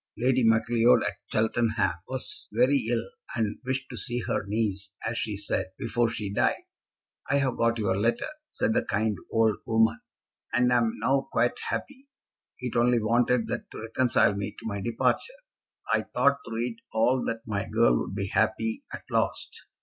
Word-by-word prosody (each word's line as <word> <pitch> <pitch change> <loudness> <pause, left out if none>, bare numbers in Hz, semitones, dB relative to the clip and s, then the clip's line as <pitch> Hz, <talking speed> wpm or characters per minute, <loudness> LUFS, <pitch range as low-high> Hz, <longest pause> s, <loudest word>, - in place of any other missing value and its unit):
Lady 130 +1 +2
Macleod, 115 +1 +4
at - - -2
Cheltenham, 110 -3 +1 0.2
was 130 -1 -3
very 125 +2 +3
ill, 120 -1 0 0.3
and 110 -3 -1
wished 130 +1 -2
to - - -6
see 120 +4 -2
her 100 - -2
niece, 100 -2 -2
as 115 - -2
she 110 -3 -2
said, 100 -1 -1
before 115 0 +1
she 105 -3 -4
died. - - +1 0.7
"I 140 - +3
have 135 -3 +1
got 115 0 +2
your 100 -4 +1
letter," 115 +2 +1 0.3
said - - 0
the - - +2
kind 105 0 0 0.2
old 110 -1 +3
woman, 110 -1 +3 0.5
"and 125 0 +3
am 115 -2 +3
now 135 0 +1
quite 120 +1 +1
happy. 275 0 -5 0.5
It 125 -1 -4
only 120 +1 +4
wanted 120 +1 +2
that - - -4
to - - -8
reconcile 115 -2 +2
me 100 +1 -4
to - - -11
my 100 -3 -3
departure. 120 - 0 0.6
I - - +3
thought 140 0 +2
through 115 +1 -2
it 120 -2 -4 0.2
all 125 +3 +2
that 115 -1 -2
my 105 -2 -2
girl - - +4
would 95 - -4
be 100 -1 -1
happy 110 +2 0
at - - -7
last. - - -1
115 Hz, 175 wpm, -27 LUFS, 110-125 Hz, 0.7 s, Macleod